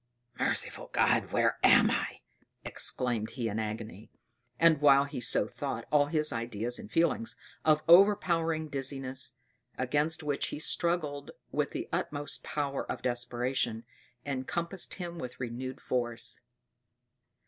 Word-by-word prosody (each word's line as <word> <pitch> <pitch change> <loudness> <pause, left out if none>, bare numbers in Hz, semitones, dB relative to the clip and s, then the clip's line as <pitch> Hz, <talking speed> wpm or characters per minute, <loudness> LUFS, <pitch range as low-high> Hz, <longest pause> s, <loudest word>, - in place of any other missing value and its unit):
"Merciful - - -2
God, - - +2
where - - +2
am - - +7
I!" - - -2 0.4
exclaimed 120 -4 -1
he 120 -2 -1
in 105 +1 -2
agony; 110 0 -5 0.5
and 165 -3 +5
while 140 -1 +7
he 140 -3 -6
so 110 - +3
thought, 120 -1 -4
all 145 -1 +4
his 150 -2 +2
ideas 115 +1 -3
and 105 - -10
feelings 170 +8 +1 0.3
of 155 -1 +3
overpowering 170 -4 +5
dizziness, 135 -2 -2 0.4
against 150 +5 0
which 145 -2 -1
he - - -5
struggled 155 -3 0 0.2
with - - 0
the - - -5
utmost 145 0 -3
power 140 -2 -2
of - - -6
desperation, 120 -1 -1 0.4
encompassed 170 +7 -3
him 175 -2 -6
with 125 -3 -7
renewed 130 +2 -5
force. 120 -2 -1
140 Hz, 125 wpm, -30 LUFS, 120-155 Hz, 0.5 s, am